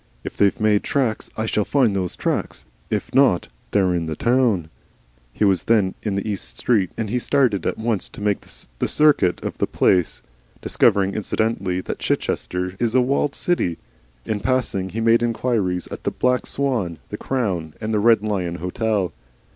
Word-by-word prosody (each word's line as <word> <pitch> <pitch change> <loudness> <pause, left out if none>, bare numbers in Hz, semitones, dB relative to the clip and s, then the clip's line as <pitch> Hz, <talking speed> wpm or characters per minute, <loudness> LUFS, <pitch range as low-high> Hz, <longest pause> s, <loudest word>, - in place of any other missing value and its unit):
"If - - -6
they've 100 -1 +2
made 105 -1 +3
tracks, 125 -6 -1
I 110 - -1
shall 105 -1 +1
find 120 -4 +2
those 90 -2 -2
tracks. - - -2 0.2
If - - -3
not 130 -9 +3 0.2
they're 95 -3 +2
in 85 -2 -1
the 80 - -3
town." 115 - +1 0.6
He 105 - 0
was 95 -3 +2
then 105 -5 +3
in 100 -3 -2
East 105 -3 -4
Street, 105 -7 +2
and 110 - -2
he 125 - +1
started 120 - +1
at - - -1
once 110 -3 -1
to - - -12
make 105 -1 0 0.4
the - - +1
circuit 145 -13 +3
of - - -5
the - - +1
place, 90 -3 +1 0.4
discovering 100 -1 +2
incidentally 100 -4 -1
that - - -5
Chichester 90 +1 -2
is 120 0 0
a 130 - +6
walled 140 +3 0
city. 130 - 0 0.5
In 105 - -2
passing, 105 -6 -1
he 115 +4 -4
made 115 +1 +4
inquiries 115 -6 0
at - - -8
the - - +1
Black 125 0 0
Swan, 120 - -1
the - - -4
Crown, 95 - -2
and 110 0 -3
the 105 - +2
Red 110 0 +4
Lion 95 -5 -1
Hotel. 95 +2 -1
105 Hz, 175 wpm, -22 LUFS, 95-120 Hz, 0.6 s, a